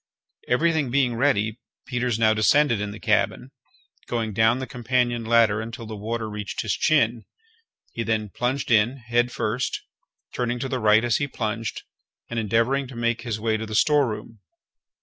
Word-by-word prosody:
Everything 155 +1 +2
being 130 -1 +2
ready, 115 -3 +1 0.3
Peters 125 -2 -1
now 110 -1 +4
descended 115 +1 +3
in 105 - -3
the 105 +1 -8
cabin, 115 +4 0 0.6
going 115 -3 -2
down 110 +3 +3
the 130 - -4
companion 120 -1 -1
ladder 110 -2 +3
until 115 +1 -7
the 110 0 -7
water 110 +2 -3
reached 105 -1 -5
his 105 - 0
chin. 120 -7 +2 0.7
He 115 - -4
then 110 -2 -1
plunged 125 +5 -2
in, 115 +4 +3
head 120 0 0
first, 115 +2 -2 0.5
turning 120 0 -1
to 135 - -3
the 130 -1 -2
right 110 +1 +4
as 120 - +2
he 145 - -1
plunged, 115 -3 -4 0.5
and 120 - -1
endeavouring 115 +6 +1
to 125 - -11
make 115 0 -1
his 115 -3 -3
way 110 0 0
to 110 0 -5
the 110 - -5
storeroom. 115 -5 +1
115 Hz, 170 wpm, -24 LUFS, 110-125 Hz, 0.7 s, now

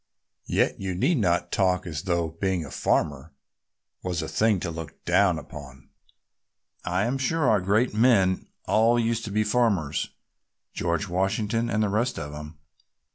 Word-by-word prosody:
Yet - - +1
you 95 -2 -3
need 135 - +2
not 90 -3 +1
talk 90 -2 +1
as 80 -3 -4
though 85 -3 0
being 95 -4 0
a 70 - -10
farmer 75 +2 -1 0.7
was 90 -3 -2
a - - -4
thing 110 -3 +2
to 85 - -3
look 80 -2 -9
down 100 -4 +3
upon. 70 -4 -11 0.9
I 90 +3 0
am 130 +3 -1
sure 140 +2 +1
our 105 -4 +4
great 105 +6 +2
men 105 -5 +3 0.2
all 115 +2 +3
used 115 0 0
to 105 - -5
be 105 +1 +2
farmers, 105 - +1 0.6
George 85 +4 -1
Washington 100 +5 0
and 110 +1 +1
the 105 - +1
rest 115 +5 0
of 75 -2 -5
'em. 75 +1 -9
95 Hz, 160 wpm, -26 LUFS, 85-110 Hz, 0.9 s, our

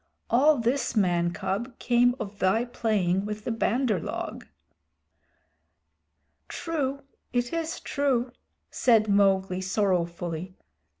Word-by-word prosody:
All 290 +5 +5
this, 240 +2 0
man 175 -4 +2
cub, 200 +7 -3
came 245 0 +3
of 205 -2 -6
thy 205 +6 +2
playing 200 -6 0
with 210 0 -5
the 240 - -2
Bandar 225 +2 +1
log." - - -5 2.0
"True, 280 -5 -3 0.3
it 245 +2 0
is 330 0 -2
true," 260 -4 0 0.4
said 225 -4 +3
Mowgli 195 -2 +2
sorrowfully. 180 -2 -1
220 Hz, 105 wpm, -27 LUFS, 190-245 Hz, 2.0 s, All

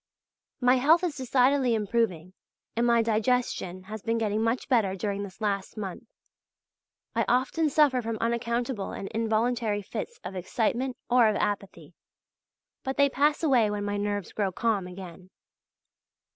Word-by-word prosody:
My 250 0 +4
health 315 +7 +4
is 340 -5 -1
decidedly 260 -1 +2
improving 205 -5 -1 0.4
and 235 +1 +2
my 235 -1 +4
digestion 220 -5 0
has 210 +2 -7
been 230 +2 0
getting 215 -1 0
much 230 +2 0
better 215 -7 +2
during 200 +1 -2
this 195 0 -8
last 200 -1 -2
month. 200 +1 -6 1.1
I - - +1
often 265 +6 +2
suffer 280 -3 +3
from 225 -1 -3
unaccountable 235 -1 -2
and 195 - -6
involuntary 225 -1 0
fits 470 - -6
of 190 - -6
excitement 235 +7 -1
or 245 -2 +5
of 215 - 0
apathy; 200 -1 -3 0.9
but 265 0 -3
they 280 0 +5
pass 295 +4 +2
away 250 -8 +4
when 205 0 -2
my 205 0 -1
nerves 205 -1 -3
grow 200 -3 0
calm 205 -1 0
again. 180 0 -10
225 Hz, 145 wpm, -27 LUFS, 205-250 Hz, 1.1 s, or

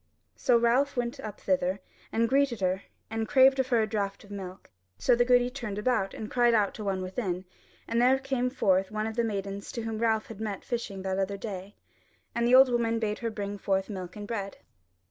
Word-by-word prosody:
So 245 -2 +3
Ralph 245 +4 +2
went 240 0 -2
up 215 -2 -7
thither, 185 0 0 0.3
and 230 +1 +2
greeted 270 -2 +2
her, 185 0 0 0.3
and 225 0 -2
craved 265 +2 +5
of 260 - +2
her 235 -4 +3
a - - -1
draught 200 -2 -3
of 205 - -15
milk; 190 - -8 0.3
so 100 - +3
the 240 - +4
goody 245 0 +3
turned 235 -6 -5
about 210 -3 0
and 215 - -6
cried 240 -1 +4
out 205 -3 +2
to 215 - -7
one 190 -2 -1
within, 185 -1 -3 0.4
and 230 +1 +1
there 255 +2 +5
came 265 -2 -1
forth 195 -7 +2
one 215 0 -2
of 220 0 -4
the 235 - +1
maidens 200 -2 -4
whom 225 -2 -3
Ralph 220 -1 +1
had 220 -1 -10
met 210 -3 -4
fishing 225 -6 -4
that 190 0 -1
other 195 +1 -1
day, 195 -1 -7 0.6
and 235 0 +1
the 250 - +6
old 265 0 +8
woman 230 -1 +1
bade 215 -2 -2
her 230 - -2
bring 205 -2 -5
forth 195 +1 0
milk 185 -2 -6
and 205 -1 -7
bread. 200 -4 -4
220 Hz, 215 wpm, -28 LUFS, 195-240 Hz, 0.6 s, old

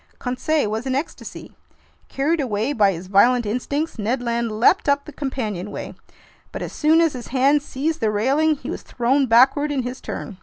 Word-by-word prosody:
Conseil 265 +2 -1
was 225 +4 -3
in 260 - 0
ecstasy. 290 +5 -6 0.6
Carried 300 +4 0
away 230 +1 -1
by 205 -6 +3
his 175 0 -7
violent 230 +6 +3
instincts, 255 +6 -3
Ned 230 +5 -1
Land 235 -1 -2
leaped 235 - +3
up 280 0 +1
the 305 - -9
companionway. 215 - -5 0.6
But - - -5
as - - -7
soon 320 +2 +3
as 330 -3 +2
his 245 -2 -7
hands 275 +3 +2
seized 310 +4 -3
the 220 - +1
railing, 275 +9 +2
he 275 +1 -7
was - - -5
thrown 260 +3 0
backward 265 +6 +4
in 270 -3 -1
his 250 +2 -6
turn. 190 - -7
255 Hz, 185 wpm, -21 LUFS, 225-290 Hz, 0.6 s, backward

